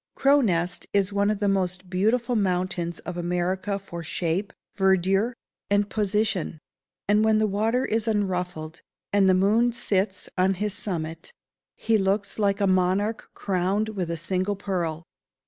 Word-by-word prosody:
Crow 280 +1 +4
Nest 180 -5 0
is 200 0 +2
one 200 0 +2
of 215 - 0
the 205 0 0
most 185 -1 0
beautiful 225 +7 +1
mountains 180 -4 -1
of 180 0 -6
America 180 +3 -1
for 180 -3 -8
shape, 175 +5 -2 0.2
verdure, 195 +4 +2 0.3
and 205 0 +1
position; 210 -5 0 0.5
and 210 +1 +4
when 220 0 +4
the 215 - +3
water 220 +5 +1
is 225 +1 -1
unruffled, 180 -6 -2 0.3
and 200 -2 +4
the 185 - +5
moon 215 +6 +3
sits 195 -4 -1
on 190 +1 +3
his 205 +2 -2
summit, 165 -5 -5 0.4
he 225 -1 +1
looks 200 +2 0
like 200 -1 +2
a 200 - +2
monarch 190 +4 +1
crowned 195 +3 0
with 190 -6 -3
a 170 - -2
single 185 +4 -1
pearl. 175 -5 -3
195 Hz, 150 wpm, -25 LUFS, 180-210 Hz, 0.5 s, the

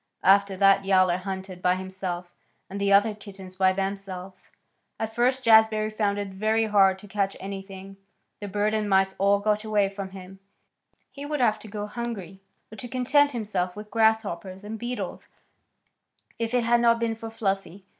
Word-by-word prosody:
After 195 0 +4
that 195 0 +5
Yowler 185 -2 +3
hunted 190 -1 -6
by 180 0 +3
himself, 185 -2 -5 0.4
and 200 +1 -5
the 200 0 +1
other 205 +2 +5
kittens 195 -3 -11
by 190 0 +4
themselves. 195 -1 -5 0.5
At 220 0 -3
first 255 +3 +1
Jazbury 220 -1 +5
found 205 -2 0
it 205 -1 -3
very 215 +3 0
hard 195 -3 +4
to 205 - -13
catch 200 -1 -2
anything. 195 0 -8 0.4
The 205 - -6
birds 210 +2 0
and 210 -1 -1
mice 190 0 +3
all 200 +1 +4
got 210 +1 0
away 210 -2 +1
from 195 -1 -6
him. 190 0 -11 0.7
He 280 - -9
would 295 0 -3
have 235 -4 +4
had 215 - -16
to 220 - -11
go 205 0 -5
hungry 210 -5 -6 0.3
or 220 - -10
to 245 - -7
content 265 +4 +2
himself 195 -6 -2
with 210 0 -10
grasshoppers 210 -4 0
and 215 +1 -6
beetles 240 +2 -5 1.1
if 230 +1 -1
it 245 - +2
had 235 +1 +3
not 235 -1 +4
been 230 -1 0
for 225 0 -8
Fluffy. 195 -4 -3
200 Hz, 175 wpm, -26 LUFS, 190-220 Hz, 1.1 s, that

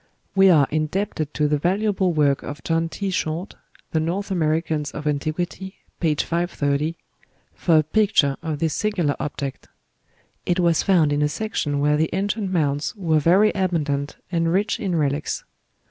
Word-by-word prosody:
We 195 -1 +6
are 155 -6 +6
indebted 155 0 -1
to 150 -1 +2
the 150 0 +1
valuable 190 +2 +1
work 145 -4 +2
of 145 0 -8
John 165 0 0
T. 195 +3 -3
Short 170 +1 -2 0.4
("The 160 - +1
North 185 +6 -2
Americans 155 -3 0
of 150 +1 -7
Antiquity," 165 +6 -2 0.2
p. 160 -3 +1
530) 155 -2 -1 0.6
for 165 -3 +2
a 155 - +4
picture 155 -5 +2
of 160 -2 -3
this 160 0 0
singular 180 -7 0
object. 140 -2 -5 0.8
It 175 +1 0
was 170 -2 +3
found 165 -7 +3
in 145 - 0
a 150 - +2
section 150 -6 -2
where 150 +1 +2
the 160 +1 +1
ancient 200 +1 -1
mounds 145 0 0
were 165 -6 +1
very 185 +8 +4
abundant 150 -7 -1 0.2
and 165 -2 +1
rich 200 +5 +1
in 190 -5 -1
relics. 145 -1 -1
165 Hz, 160 wpm, -23 LUFS, 150-185 Hz, 0.8 s, We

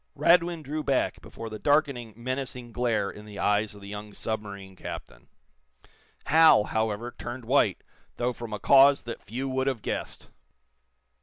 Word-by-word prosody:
Radwin 170 -1 +3
drew 150 +2 -3
back 135 -3 0
before 115 - -8
the 110 -1 -7
darkening, 140 -4 +1
menacing 125 -1 -4
glare 115 -4 0
in 105 - -12
the 105 -1 -10
eyes 105 +1 +1
of 100 - -13
the 100 - -10
young 105 0 -8
submarine 100 -3 -5
captain. - - -9 1.0
Hal, 160 -7 +6
however, 110 +2 -2
turned 120 0 -7
white 115 -6 +2 0.3
though 125 +1 0
from 120 -1 -8
a 105 - -2
cause 140 +5 +6
that 115 - -7
few 125 +6 -4
would 130 0 -1
have 125 -6 -1
guessed. - - -5
120 Hz, 155 wpm, -27 LUFS, 105-135 Hz, 1.0 s, Hal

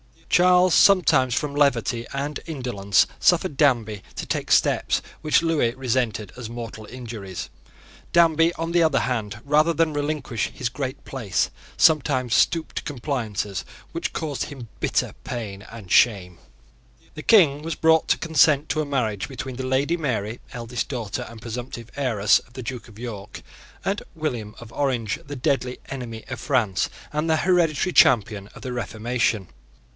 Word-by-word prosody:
Charles 180 0 +5
sometimes, 145 -10 +5
from 145 +4 -1
levity 120 -5 +1
and 140 +2 -3
indolence, 120 - +1
suffered 145 - +3
Danby 115 -8 +2
to - - -4
take - - -3
steps - - +3 0.2
which 155 +1 +3
Lewis 150 -8 +1
resented 120 -6 -1
as 120 -3 -6
mortal 115 -2 -7
injuries. 110 -6 -7 0.6
Danby, 165 -1 +5
on 165 0 -4
the 175 0 +3
other 155 -4 +3
hand, 110 -4 -3
rather 150 +3 +3
than 160 -1 +1
relinquish 145 -6 -2
his 125 - -2
great 130 +1 -5
place, 115 -8 -1 0.3
sometimes 130 -6 +3
stooped 165 -1 +2
to - - -2
compliances 115 - -3 0.3
which 165 - -3
caused 150 -4 -3
him 130 -6 -9
bitter - - 0
pain 105 -5 -5
and 110 -5 -10
shame. 90 -7 +3 0.7
The 155 - -7
King 155 -10 +5
was 165 +1 -4
brought 160 0 +3
to - - +3
consent 155 -2 +3
to 155 +1 +1
a - - -2
marriage 115 -8 -1
between 130 -1 -6
the 130 0 -3
Lady 140 +6 +1
Mary, 120 -7 -2
eldest 120 -1 -4
daughter 115 -7 -4
and 115 -1 -11
presumptive 120 0 -7
heiress 110 -7 +3
of 120 - -22
the 130 - -7
Duke 125 0 -6
of 105 -2 -15
York 110 -4 -7 0.4
and 200 +1 0
William 120 -9 -3
of 120 -1 -11
Orange, 125 -7 -1
the 145 - -5
deadly 130 -2 0
enemy 120 -4 -6
of 130 - -5
France 115 -9 +1 0.2
and 155 +2 -1
the 160 - +4
hereditary 175 -1 +2
champion 105 -5 +4
of - - -11
the 130 -2 -4
Reformation. 115 -4 -1
130 Hz, 155 wpm, -24 LUFS, 115-150 Hz, 0.7 s, Charles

